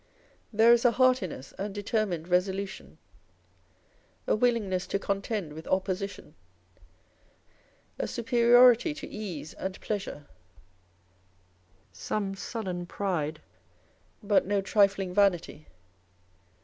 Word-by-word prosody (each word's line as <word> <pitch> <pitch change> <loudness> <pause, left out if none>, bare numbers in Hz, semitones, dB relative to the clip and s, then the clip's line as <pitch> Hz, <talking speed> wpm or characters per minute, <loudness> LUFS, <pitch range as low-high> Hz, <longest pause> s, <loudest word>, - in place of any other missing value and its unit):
There 225 +2 +6
is 235 - +3
a 245 -2 +4
heartiness 250 - +1
and 200 +1 -4
determined 205 -5 -2
resolution; 190 0 -2 1.3
a - - +2
willingness 215 -6 0
to 200 - 0
contend 200 -4 -3
with 160 +1 -10
opposition; 190 -2 -2 1.7
a - - -1
superiority 245 +3 +4
to - - -8
ease 170 -8 -7
and 190 0 -6
pleasure; 200 -8 -5 1.7
some 200 -2 -3
sullen 185 -4 -5
pride, 160 -7 -2 0.8
but 205 -2 +2
no 205 0 +1
trifling 195 -2 +2
vanity. 180 -6 +1
200 Hz, 95 wpm, -28 LUFS, 180-220 Hz, 1.7 s, There